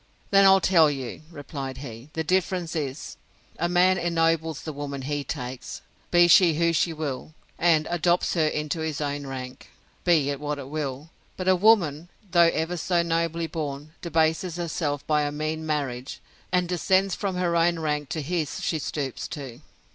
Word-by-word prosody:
Then 195 0 +6
I'll 195 0 +7
tell 170 -5 +5
you, 135 -2 -5
replied 140 -4 -6
he; 130 0 -9
the 160 - -2
difference 180 -1 0
is, 145 -2 -4 0.4
a 170 - +1
man 180 +1 +4
ennobles 165 -2 +1
the 155 - -5
woman 140 -1 -5
he 145 +1 -2
takes, 125 -3 -6 0.3
be 175 0 +6
she 175 -2 +6
who 170 +1 +2
she 165 +1 +2
will; 155 -1 -5 0.2
and 160 -3 +4
adopts 175 +1 +1
her 160 -3 +2
into 150 +1 -2
his 160 -2 -3
own 145 -1 -3
rank, 130 0 -7 0.3
be 155 -5 +3
it 140 - -4
what 150 0 -3
it 135 -1 -8
will: 150 0 -4 0.3
but 185 - -4
a 185 - +6
woman, 175 -6 +3 0.2
though 170 -2 +6
ever 165 +3 -2
so 170 +1 +1
nobly 165 0 0
born, 150 -2 -5
debases 165 +1 +1
herself 155 -4 -2
by 150 -1 +2
a 145 0 -1
mean 155 +2 -3
marriage, 140 -4 -3 0.3
and 180 -1 +2
descends 185 +2 +2
from 195 -1 -2
her 175 -1 0
own 170 0 +3
rank 150 -3 -2
to 155 - -3
his 160 0 -2
she 160 - 0
stoops 140 -3 -4
to. 135 -3 -8
160 Hz, 175 wpm, -25 LUFS, 145-175 Hz, 0.4 s, I'll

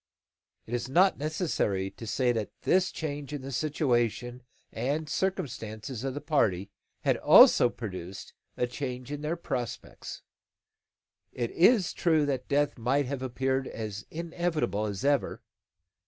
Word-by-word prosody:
It 115 - -8
is 120 +1 -2
not 185 +6 +4
necessary 140 - -1
to 115 - -10
say 125 +3 +2
that 110 -3 -2
this 185 0 +3
change 145 -2 -5
in 145 -3 -5
the 135 - -6
situation 120 -4 0 0.3
and 145 +7 -2
circumstances 125 - -3
of 135 -1 -2
the 145 - -4
party 100 - +1 0.3
had - - +2
also 120 - +7
produced 95 -5 -7 0.2
a 125 - +2
change 125 0 -5
in 145 0 -4
their 155 +3 -1
prospects. 125 -7 -5 1.1
It 120 -2 -3
is 195 +1 +4
true 160 -4 +2
that 135 -3 -2
death 145 -2 +1
might 135 +5 +1
have 135 0 -4
appeared 130 +1 -1
as 105 -3 -5
inevitable 165 -9 -1
as 100 +3 -4
ever. 145 -2 +1
130 Hz, 140 wpm, -29 LUFS, 115-150 Hz, 1.1 s, also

